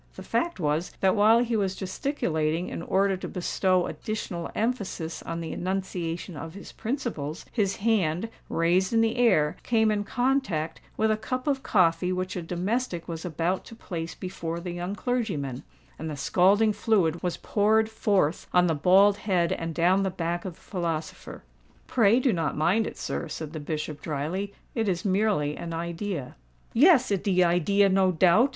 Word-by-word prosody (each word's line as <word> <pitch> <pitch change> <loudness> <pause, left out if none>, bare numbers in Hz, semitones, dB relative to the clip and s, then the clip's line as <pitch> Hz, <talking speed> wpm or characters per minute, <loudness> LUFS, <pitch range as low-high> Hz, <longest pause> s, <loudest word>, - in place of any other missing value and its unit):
The - - -8
fact 340 - -1
was 155 +1 -1
that 190 -1 +4
while 220 +3 +5
he 235 -1 -1
was 195 -3 0
gesticulating 175 - -1
in - - -5
order 195 +3 +2
to - - -6
bestow 185 0 +1
additional 180 -6 -4
emphasis 200 -8 -2
on 165 0 -5
the 165 - -5
enunciation 180 -2 -3
of 165 +3 -7
his 200 - -10
principles, 220 - -4
his 200 -5 0
hand, 195 -4 +1 0.2
raised 180 +4 +2
in 225 - +4
the 225 +2 +1
air, 155 -12 +3
came 220 -2 +2
in 205 -1 0
contact 245 - -1 0.2
with 220 0 +2
a 215 - +1
cup 255 +4 -4
of 275 -3 0
coffee 180 -5 +2
which 185 0 -2
a 180 - -2
domestic 180 +2 -2
was 165 -2 -5
about 175 +2 -1
to 230 - -11
place 165 -6 -6
before 170 -3 -5
the 175 +1 -5
young 175 +3 -4
clergyman; 190 - -2 0.4
and 160 - -4
the 150 - -5
scalding 200 +8 +3
fluid 180 -8 +1
was 180 -1 -2
poured 220 +1 +2
forth 200 -7 0
on 180 0 +4
the 165 - +2
bald 190 +6 +5
head 180 -5 +1
and 165 -1 -3
down 180 +3 +3
the 195 - +1
back 175 -1 -3
of 180 -3 -5
the - - -24
philosopher. 170 -5 -4 0.4
"Pray 230 0 +4
do 255 -3 +2
not 165 -5 -1
mind 185 +8 +2
it, - - -7
sir," - - -3
said 155 -1 -6
the 155 - -4
Bishop, 150 0 -4
drily: 165 +7 -3 0.2
"it 225 -4 0
is 175 0 -2
merely 190 -7 +1
an 165 -1 -5
idea." 170 -3 -4 0.4
"Yes—it 255 - +5
de 185 -3 +3
idea, 180 +4 +3
no 190 -1 +3
doubt!" 185 - +4
185 Hz, 175 wpm, -27 LUFS, 165-215 Hz, 0.4 s, while